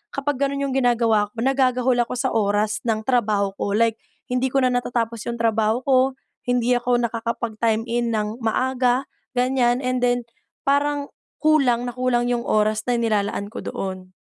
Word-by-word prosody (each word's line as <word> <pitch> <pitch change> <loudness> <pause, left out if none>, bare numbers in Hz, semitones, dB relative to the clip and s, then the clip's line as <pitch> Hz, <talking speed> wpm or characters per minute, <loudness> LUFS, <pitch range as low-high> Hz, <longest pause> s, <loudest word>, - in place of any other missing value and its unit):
kapag 275 0 -1
gano'n 280 0 0
'yong 275 -1 -2
ginagawa 230 -5 +2
ko, - - -43
nagagahol 255 -1 +2
ako 240 - 0
sa 260 +1 0
oras 210 0 +1
ng 220 -1 0
trabaho 210 -6 +1
ko. 200 - -1
Like, 225 0 +2 0.3
hindi 250 +1 +1
ko 270 +1 +1
na 255 - +3
natatapos 235 -2 -2
'yong 235 0 -3
trabaho 225 +1 +1
ko. 265 -2 +4 0.5
Hindi 245 0 +2
ako 245 0 +1
nakakapag-time-in 230 0 -1
nang 215 +1 -2
maaga, 255 +3 +1 0.3
ganiyan. 250 -1 +2
And 255 0 0
then 245 -1 +1 0.4
parang 285 0 0 0.2
kulang 270 -6 +3
na 245 - -4
kulang 250 -1 +1
'yong 240 - -1
oras 215 0 +2
nailalaan 215 -3 0
ko - - -5
doon. 185 -1 -5
240 Hz, 155 wpm, -22 LUFS, 220-255 Hz, 0.5 s, ko